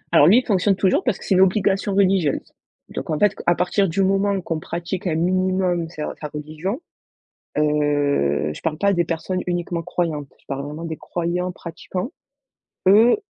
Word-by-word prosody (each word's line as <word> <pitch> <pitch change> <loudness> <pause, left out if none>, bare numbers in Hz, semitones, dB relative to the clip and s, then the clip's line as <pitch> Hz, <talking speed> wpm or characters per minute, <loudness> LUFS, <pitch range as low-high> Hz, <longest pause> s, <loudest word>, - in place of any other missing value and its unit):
Alors 145 - +7
lui, 210 +7 +7
il 255 - +2
fonctionne 195 -1 +2
toujours 190 -1 +2
parce - - 0
que - - -11
c'est - - +2
une 185 - +5
obligation 195 +1 +2
religieuse, 190 -6 +2 0.4
donc - - -6
en 155 - 0
fait 205 +3 +3
qu - - -9
à 175 - +5
partir 185 +2 +1
du 195 +4 +1
moment 195 +1 +2
qu'on 165 -2 -3
pratique 175 +4 -4
un 160 - 0
minimum 185 -1 +1
ses 155 -3 -6 0.2
sa 150 - -3
religion, 155 - -5 0.8
heu, 145 - +1
je - - -9
parle 160 0 -2
pas 200 0 +3
des 175 -1 +1
personnes 170 +3 -2
uniquement 175 -1 -2
croyantes, 155 -6 -3
je - - -30
parle 140 0 -3
vraiment 155 +3 -6
des 160 -1 -4
croyants 180 +1 -2
pratiquants. 180 - -6 0.8
Eux, 215 +5 +7
175 Hz, 185 wpm, -22 LUFS, 155-190 Hz, 0.8 s, Alors